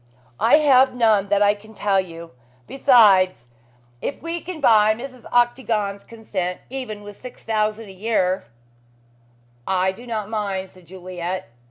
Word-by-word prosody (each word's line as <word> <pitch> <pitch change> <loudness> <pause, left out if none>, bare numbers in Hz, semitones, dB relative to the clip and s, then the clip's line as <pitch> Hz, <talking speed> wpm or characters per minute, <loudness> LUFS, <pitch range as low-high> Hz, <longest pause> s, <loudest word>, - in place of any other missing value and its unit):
"I 230 +5 +5
have 265 -4 +4
none 215 -5 +2
that 205 0 +3
I 205 0 +4
can 215 +1 -15
tell 200 -2 +1
you. 170 -2 -10 0.3
Besides, 195 - +4 0.5
if - - -4
we 335 +1 -5
can 355 -2 -7
buy 215 -5 +4
Mrs. 255 +1 -10
Octagon's 230 -5 0
consent 190 -6 -5
with - - -31
even 210 -6 -6
six 250 +4 -12
thousand 215 0 -1
a - - -10
year 190 - -1 0.6
" 120 0 -35 0.2
"I 190 - +2
do 235 +6 -13
not 215 -3 -3
mind," 200 -3 -3
said 185 -2 -19
Juliet. 180 -1 -6
210 Hz, 150 wpm, -22 LUFS, 185-235 Hz, 0.6 s, I